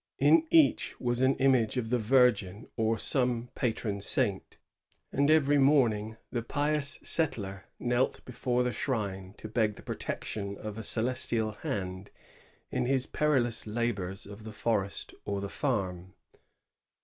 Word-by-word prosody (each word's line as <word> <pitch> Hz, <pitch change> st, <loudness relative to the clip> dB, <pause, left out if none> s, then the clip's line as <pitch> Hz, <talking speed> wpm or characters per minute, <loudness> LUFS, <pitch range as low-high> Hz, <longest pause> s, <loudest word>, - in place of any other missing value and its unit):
In 330 Hz, -1 st, +5 dB
each 320 Hz, -3 st, +3 dB
was 120 Hz, 0 st, 0 dB
an 130 Hz, +1 st, +4 dB
image 130 Hz, -3 st, +3 dB
of 115 Hz, -2 st, -2 dB
the 125 Hz, -, +3 dB
Virgin 110 Hz, -4 st, +3 dB
or 110 Hz, 0 st, +1 dB
some 125 Hz, 0 st, 0 dB
patron 110 Hz, -4 st, -2 dB
saint; -, -, -1 dB, 0.5 s
and 140 Hz, +2 st, +2 dB
every 145 Hz, -2 st, +4 dB
morning 115 Hz, -6 st, +3 dB
the 120 Hz, -, -1 dB
pious 145 Hz, +3 st, 0 dB
settler 100 Hz, -, 0 dB
knelt 125 Hz, +1 st, 0 dB
before 125 Hz, 0 st, 0 dB
the 125 Hz, -, 0 dB
shrine 100 Hz, -7 st, -3 dB
to -, -, -7 dB
beg 110 Hz, -1 st, +1 dB
the -, -, -13 dB
protection 100 Hz, -2 st, -4 dB
of 105 Hz, 0 st, -6 dB
a -, -, -5 dB
celestial 115 Hz, -1 st, 0 dB
hand 95 Hz, -2 st, -4 dB, 0.6 s
in -, -, 0 dB
his 130 Hz, -1 st, +1 dB
perilous 130 Hz, -8 st, +1 dB
labors 105 Hz, -4 st, -2 dB
of 100 Hz, +2 st, -10 dB
the 110 Hz, 0 st, -8 dB
forest 105 Hz, -3 st, -1 dB
or 100 Hz, -1 st, -2 dB
the 100 Hz, -, -3 dB
farm. 95 Hz, -10 st, -2 dB
115 Hz, 140 wpm, -30 LUFS, 105-130 Hz, 0.6 s, In